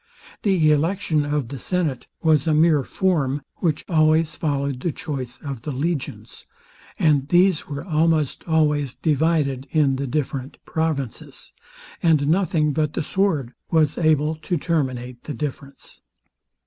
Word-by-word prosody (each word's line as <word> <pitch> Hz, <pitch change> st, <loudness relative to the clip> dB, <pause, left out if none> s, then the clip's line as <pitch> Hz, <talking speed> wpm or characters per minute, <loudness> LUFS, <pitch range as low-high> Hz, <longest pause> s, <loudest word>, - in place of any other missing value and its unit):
The 180 Hz, -7 st, +3 dB
election 155 Hz, 0 st, +1 dB
of 145 Hz, -5 st, -1 dB
the 140 Hz, -, -6 dB
senate 160 Hz, -8 st, -2 dB, 0.2 s
was 155 Hz, -2 st, +3 dB
a 155 Hz, -, +3 dB
mere 155 Hz, -2 st, +4 dB
form, 145 Hz, -4 st, 0 dB
which 155 Hz, -4 st, -1 dB
always 155 Hz, -1 st, +3 dB
followed 140 Hz, -3 st, -1 dB
the 170 Hz, +5 st, -1 dB
choice 130 Hz, -6 st, -5 dB
of 135 Hz, -5 st, -5 dB
the 150 Hz, -, -6 dB
legions; 145 Hz, +2 st, -4 dB, 0.5 s
and 145 Hz, -4 st, +2 dB
these 180 Hz, +1 st, +3 dB
were 145 Hz, -1 st, -5 dB
almost 160 Hz, -4 st, +1 dB
always 150 Hz, -4 st, +1 dB
divided 150 Hz, -3 st, +1 dB
in 145 Hz, -4 st, +2 dB
the 140 Hz, 0 st, -3 dB
different 135 Hz, -1 st, -3 dB
provinces, 155 Hz, -7 st, -3 dB, 0.5 s
and 155 Hz, -4 st, +3 dB
nothing 160 Hz, -4 st, +2 dB
but 155 Hz, -1 st, 0 dB
the 160 Hz, -, -2 dB
sword 155 Hz, -10 st, 0 dB, 0.2 s
was 155 Hz, -3 st, +2 dB
able 155 Hz, -2 st, +3 dB
to 165 Hz, +3 st, -2 dB
terminate 130 Hz, -6 st, -2 dB
the 150 Hz, -, -5 dB
difference. 140 Hz, -2 st, -7 dB
150 Hz, 135 wpm, -22 LUFS, 140-160 Hz, 0.5 s, mere